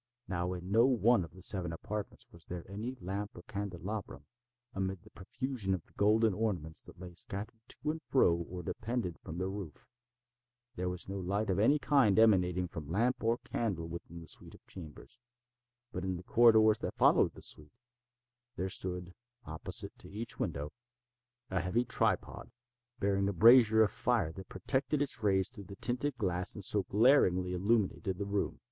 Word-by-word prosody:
Now 90 -1 -2
in 90 +1 -7
no 115 +4 +6
one 120 -4 +4
of 85 -1 -10
the 95 - -7
seven 90 -4 0
apartments 105 +4 -6
was 85 -2 -14
there 85 -1 -6
any 110 +7 -5
lamp 100 +3 -4
or 85 - -10
candelabrum, 100 -4 -5 0.5
amid 95 -2 -3
the - - -17
profusion 105 0 -2
of 90 - -11
golden 110 +1 +3
ornaments 90 -7 -2
that - - -15
lay 90 -1 -9
scattered 105 +5 -6
to 150 - -3
and 160 +1 -6
fro 130 - +3
or 90 +1 -6
depended 110 -2 -3
from 80 - -8
the 95 +1 -1
roof. 95 -6 -7 0.9
There 90 -4 -2
was 90 -1 -4
no 100 +1 -4
light 100 +3 -1
of 95 - 0
any 140 +8 +5
kind 130 -7 +3
emanating 90 -5 +4
from 80 -3 -8
lamp 115 +8 +1
or 115 +1 +2
candle 95 -8 -2
within 85 0 -8
the 80 - -12
suite - - -11
of - - -21
chambers. 90 - -11 0.7
But 90 - -4
in 95 -1 -2
the 90 - -9
corridors 110 0 +5
that - - -4
followed - - +4
the - - -12
suite, 75 -1 -6 0.8
there 95 +1 -2
stood, 90 -1 -5 0.3
opposite 80 0 -5
to - - -10
each 110 +3 -5
window, 75 +1 -3 0.8
a 95 - +1
heavy 115 +7 0
tripod, 115 -5 -1 0.5
bearing 100 0 +1
a - - -2
brazier 110 +2 +7
of 105 - +1
fire 120 -10 +1
that 95 +1 -10
projected 130 - -1
its 135 -4 -4
rays 95 -3 +2
through 100 -5 -10
the 100 - -10
tinted 125 +7 0
glass 90 -3 -1
and 105 - -5
so 105 - +3
glaringly 95 -6 +4
illumined 100 +2 +1
the 95 0 -2
room. 100 0 -1
100 Hz, 175 wpm, -33 LUFS, 90-110 Hz, 0.9 s, brazier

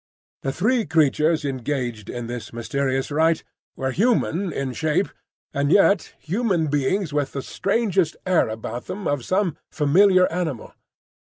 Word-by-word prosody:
The 135 - -1
three 225 - +1
creatures 155 0 +2
engaged 125 -5 -3
in 120 -1 -4
this 120 0 -6
mysterious 135 +3 -2
rite 160 +2 +2 0.3
were 130 0 -2
human 195 - +1
in 135 -3 -3
shape, 160 +5 0 0.4
and 140 +1 0
yet 200 -1 +4
human 180 -3 0
beings 145 +4 0
with 145 -2 -1
the 135 - -4
strangest 195 -5 0
air 185 -10 +3
about 110 +2 -5
them 200 -1 -4
of 145 -3 -1
some 185 - 0
familiar 185 +5 +4
animal. 160 -8 -3
155 Hz, 140 wpm, -23 LUFS, 135-185 Hz, 0.4 s, yet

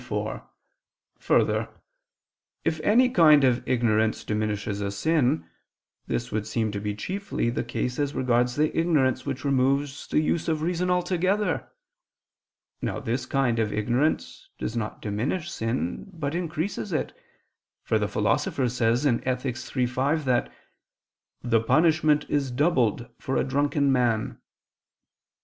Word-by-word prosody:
4: - - -4 0.8
Further, - - +2 1.0
if 160 -1 0
any 235 +10 +4
kind 155 - +6
of 125 -2 +3
ignorance 110 -3 +1
diminishes 105 -1 -2
a 100 - -1
sin, 145 +6 +1 0.6
this 120 +1 -2
would 110 0 -2
seem 110 -1 -1
to 100 - -3
be 105 0 -3
chiefly 185 - -2
the - - -2
case 125 +2 -3
as 145 0 -1
regards 125 -1 +1
the 150 +1 +1
ignorance 145 -6 +1
which 135 0 -4
removes 140 +1 +1
the - - +2
use 155 +1 0
of 155 -2 0
reason 180 +1 0
altogether. 180 +3 0 1.1
Now - - -2
this 120 +2 -3
kind 130 -4 +1
of 110 -2 0
ignorance 120 +9 -1
does 110 - -4
not 110 -2 -4
diminish 125 - -2
sin, 115 - -3
but 155 -5 -4
increases 170 +1 -3
it: - - -2 0.7
for - - +1
the - - 0
Philosopher 140 -10 0
says 120 +2 +1
(Ethic. 125 0 0 0.2
iii, 125 - +3
5) 140 +5 0
that 125 -2 +1 0.9
the 115 -2 +2
"punishment 155 +4 +3
is 140 -2 0
doubled 125 - +1
for 135 - -2
a - - +2
drunken 140 +1 +1
man." 120 -4 0
130 Hz, 135 wpm, -26 LUFS, 120-155 Hz, 1.1 s, kind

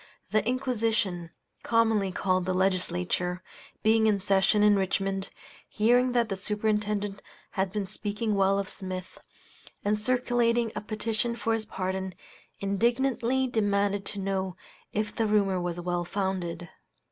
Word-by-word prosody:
The 215 +1 +3
Inquisition 225 -8 0 0.3
(commonly 225 -4 +2
called 185 -1 +1
the 185 - +1
Legislature), 180 -1 0 0.4
being 220 0 +4
in 210 -2 +3
session 195 +2 +3
in 210 -1 +6
Richmond, 195 0 -1 0.4
hearing 245 +3 +3
that 240 -2 +3
the 195 - -2
Superintendent 210 0 -1 0.3
had 190 -1 -1
been 205 0 -2
speaking 210 +2 -2
well 195 0 +3
of 200 -1 -1
Smith, 185 -1 -7 0.7
and 210 +1 +2
circulating 240 -1 +2
a - - -2
petition 220 +2 -2
for 225 -1 0
his 225 -1 -1
pardon, 190 -1 -3 0.4
indignantly 240 +5 +1
demanded 205 -4 +1
to 205 - -2
know 190 -1 -2 0.3
if 215 0 -2
the 225 - +1
rumor 200 -3 +2
was 175 0 -3
well 175 0 -1
founded. 180 -2 -3
205 Hz, 135 wpm, -28 LUFS, 190-225 Hz, 0.7 s, in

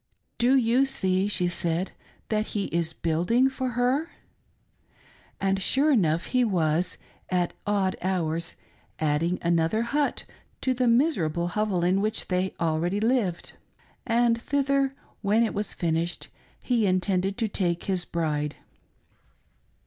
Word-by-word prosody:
" - - -49
Do 270 - +5
you 250 +1 +4
see," 190 -7 0
she 180 -3 0
said, 175 +1 -1 0.2
" - - -34
that 215 0 0
he 200 - +1
is 165 -1 0
building 175 +12 +1
for 260 -1 -2
her 265 +7 +1 0.7
?" - - -31
And 195 0 0
sure 280 +9 +3
enough 170 - +2
he 250 -1 +4
was, 175 -5 0 0.3
at 180 -2 0
odd 200 -2 +1
hours, 170 -3 -2 0.4
adding 160 +4 0
another 170 +6 +2
hut 285 +4 0 0.4
to 260 - +1
the 250 0 +1
miserable 185 - +2
hovel 200 -2 0
in 185 +3 +2
which 215 +1 -1
they 185 0 0
already 170 +4 0
lived; 220 -6 0 0.5
and 235 -1 +2
thither, 275 0 +1 0.3
when 215 +3 +3
it 225 - -1
was 205 +1 -3
finished, 170 0 -2 0.3
he 235 -5 +2
intended 185 +1 +1
to 230 -2 0
take 175 -4 -1
his 185 -3 0
bride. 150 -4 -2
195 Hz, 140 wpm, -26 LUFS, 170-235 Hz, 0.7 s, Do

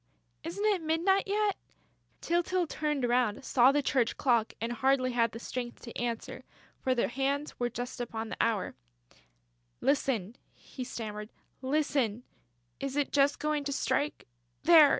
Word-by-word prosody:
"Isn't 360 +6 -3
it 405 -4 +3
midnight 335 +6 +2
yet...." 410 -1 +1 0.6
Tyltyl 350 +1 +1
turned 300 -5 -1
round, 240 -1 +1
saw 255 +1 +5
the 290 0 +1
church 255 -3 +1
clock 235 -4 +2
and 230 +2 -2
hardly 255 +1 +2
had 230 -2 +2
the - - -7
strength 240 +1 -5
to 235 - -9
answer, 235 -2 -3 0.4
for 260 -1 +1
the 240 - +2
hands 275 +4 -2
were 245 0 +1
just 245 +1 -5
upon 225 -2 -4
the - - -5
hour: 215 -5 +1 1.1
"Listen," 250 -6 0 0.2
he 255 - -8
stammered, 210 -3 -5 0.3
"listen.... 265 -5 0 0.6
It 275 0 -3
is 290 - +2
just 285 0 +3
going 300 -1 0
to 280 - -1
strike.... 275 +3 -1 0.4
There!... 320 -4 +9
265 Hz, 150 wpm, -30 LUFS, 240-300 Hz, 1.1 s, There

